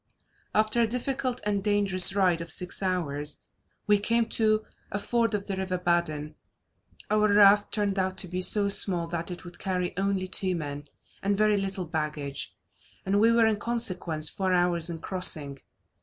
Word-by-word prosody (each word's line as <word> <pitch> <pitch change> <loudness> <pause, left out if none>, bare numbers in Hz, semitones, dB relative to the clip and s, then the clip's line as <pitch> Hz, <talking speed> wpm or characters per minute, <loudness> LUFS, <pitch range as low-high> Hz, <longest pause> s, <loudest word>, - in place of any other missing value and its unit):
After 215 +2 +2
a 230 - +3
difficult 250 +1 -2
and 200 -2 -1
dangerous 200 -3 +4
ride 180 -4 +2
of 165 -1 -5
six 180 +3 -1
hours, 150 -6 -2 0.5
we 205 -1 +3
came 230 +3 +1
to 215 -1 +1 0.3
a 200 - -2
ford 230 +1 0
of 200 -1 -4
the 195 - -3
river 190 -1 -3
Badin. 170 -4 -1 0.8
Our 215 0 +3
raft 205 0 +5
turned 200 -2 -1
out 185 0 -2
to 185 - +1
be 180 +1 -4
so 200 +2 +5
small 185 -3 +3
that 170 0 -4
it 175 -1 -7
would 175 -1 -11
carry 180 -2 -3
only 195 -1 -1
two 185 0 +2
men, 145 -3 -6 0.4
and 200 0 0
very 215 0 +3
little 195 -2 -3
baggage; 150 -3 -4 0.5
and 195 +1 +1
we 225 +2 +4
were, 230 0 +4
in 220 -1 +1
consequence, 185 -9 -1
four 190 +3 -1
hours 175 -1 +1
in 170 - -5
crossing. 155 -8 0
190 Hz, 170 wpm, -27 LUFS, 175-210 Hz, 0.8 s, raft